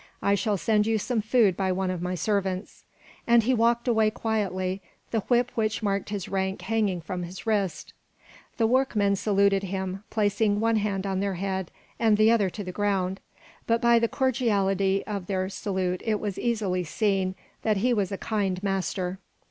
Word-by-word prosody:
I 200 - +3
shall 205 0 +1
send 210 +3 +2
you 225 0 +2
some 220 +2 -1
food 215 -3 +3
by 190 0 0
one 185 0 -1
of 180 -2 -4
my 180 +1 -2
servants." 190 +1 -2 0.4
And 235 -1 +5
he 255 +4 +2
walked 235 +1 +2
away 220 -3 +3
quietly, 195 -4 -2 0.3
the 225 - +1
whip 245 +3 +1
which 220 0 -1
marked 200 -1 -1
his 200 -3 -4
rank 190 0 -2
hanging 210 -6 0
from 180 +2 -5
his 175 +2 -8
wrist. 200 -7 -1 0.6
The 230 - +3
workmen 220 -5 +2
saluted 200 -1 +2
him, 190 0 -4
placing 205 -1 +1
one 225 0 +2
hand 200 -2 -1
on 190 -1 -1
their 200 -1 -1
head 190 -1 -3 0.3
and 220 -2 +4
the 215 +1 +5
other 210 -5 +3
to 205 +3 -6
the 185 - -5
ground, 195 -1 -1 0.5
but 230 0 +3
by 235 -1 +5
the 230 - +2
cordiality 200 -7 +1
of 200 -4 -4
their 185 -1 -1
salute 185 -2 -2
it 215 -2 0
was 205 -3 -4
easily 205 -6 0
seen 190 +1 0 0.3
that 215 -2 +1
he 245 +5 +2
was 205 -4 0
a 195 - -2
kind 195 -4 -2
master. 190 -1 -2
200 Hz, 180 wpm, -26 LUFS, 190-220 Hz, 0.6 s, And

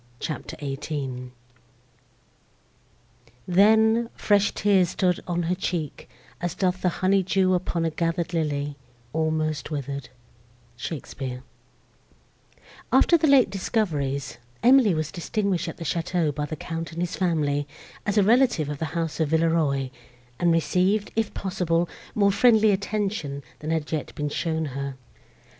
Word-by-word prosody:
CHAPTER 155 - -5
XVIII 135 -2 -4 2.2
Then, 220 +5 +4
fresh 205 -1 +3
tears 195 -4 +3
Stood 180 -2 +1
on 175 -1 -1
her 170 +2 0
cheek, 175 -5 -4 0.3
as 175 -1 -2
doth 185 -1 0
the 180 - +3
honey 190 +3 +2
dew 185 0 +2
Upon 175 -2 0
a 165 - 0
gather'd 170 +2 -1
lily 145 -3 -1 0.4
almost 155 -2 -1
wither'd 140 -2 -4 0.7
SHAKESPEARE 130 -1 -6 1.5
After 345 - +5
the 320 -1 +3
late 270 -8 +5
discoveries, 150 - -1 0.2
Emily 245 -6 +6
was 155 -1 -2
distinguished 195 +1 -1
at - - -6
the 165 - -7
château 170 -2 0
by 150 +1 -2
the 155 - -4
Count 165 +2 -5
and 165 - -7
his 175 -1 -2
family, 150 -5 0 0.4
as 205 0 -1
a 205 - +6
relative 230 - +3
of 145 -1 -4
the 160 - -1
house 165 -1 -2
of 160 -3 +1
Villeroi, 160 -5 +1 0.5
and 175 -1 +3
received, 185 +5 +1
if 225 -1 0
possible, 175 -3 0 0.3
more 200 -2 +4
friendly 220 0 +5
attention, 195 -8 -2 0.2
than 155 - -5
had 160 -2 -1
yet 155 -2 -3
been 150 0 -2
shown 160 +1 -1
her. 140 0 -4
170 Hz, 135 wpm, -25 LUFS, 150-195 Hz, 2.2 s, Emily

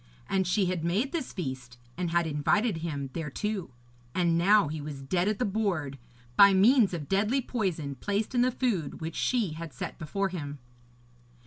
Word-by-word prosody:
And 190 -2 +1
she 190 +2 +2
had 180 -3 -1
made 200 +11 0
this 330 -7 -3
feast, 130 -8 -6 0.2
and 175 -1 -2
had 170 0 +2
invited 160 +7 +1
him 145 -4 -4
thereto, 180 +5 -3 0.5
and 170 -2 +2
now 195 +1 +5
he 155 +1 -4
was 145 -2 -7
dead 175 +7 0
at 210 -1 +1
the 250 - 0
board, 185 -10 -1 0.4
by 200 -1 +8
means 210 0 +5
of 150 -4 -6
deadly 210 +7 +2
poison 185 - -2
placed 205 - -2
in 245 - +3
the 250 - +4
food 230 - -1
which 160 0 -5
she 225 -10 0
had 165 -2 -7
set 125 - -6
before 195 +5 -1
him. 145 -5 -5
180 Hz, 180 wpm, -28 LUFS, 155-210 Hz, 0.5 s, by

